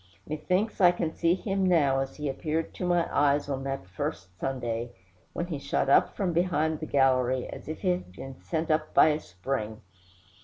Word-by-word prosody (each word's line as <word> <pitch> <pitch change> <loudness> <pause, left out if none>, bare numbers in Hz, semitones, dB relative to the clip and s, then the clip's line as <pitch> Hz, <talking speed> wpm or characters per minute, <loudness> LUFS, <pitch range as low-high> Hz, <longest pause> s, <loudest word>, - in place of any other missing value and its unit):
Methinks 185 +8 -1
I 180 - +8
can 175 -2 -2
see 170 +1 +2
him 195 0 -1
now 150 -7 +3
as 135 0 -3
he 150 -1 -4
appeared 155 +4 -2
to 180 - -3
my 175 -1 +2
eyes 145 0 +3
on 135 -1 -3
that 135 -6 -3
first 90 0 -5
Sunday, 120 -3 -2 0.4
when 170 - -2
he 165 -5 -4
shot 140 - -1
up - - +4
from 185 -4 -1
behind 160 -3 +1
the 155 - -5
gallery, 130 -2 +2
as - - -9
if 155 - -5
he 185 - +1
had 180 - -1
been 130 +8 -10
sent 160 -1 -2
up 155 0 0
by - - +7
a 150 0 +1
spring. 105 - -4
150 Hz, 195 wpm, -28 LUFS, 135-170 Hz, 0.4 s, I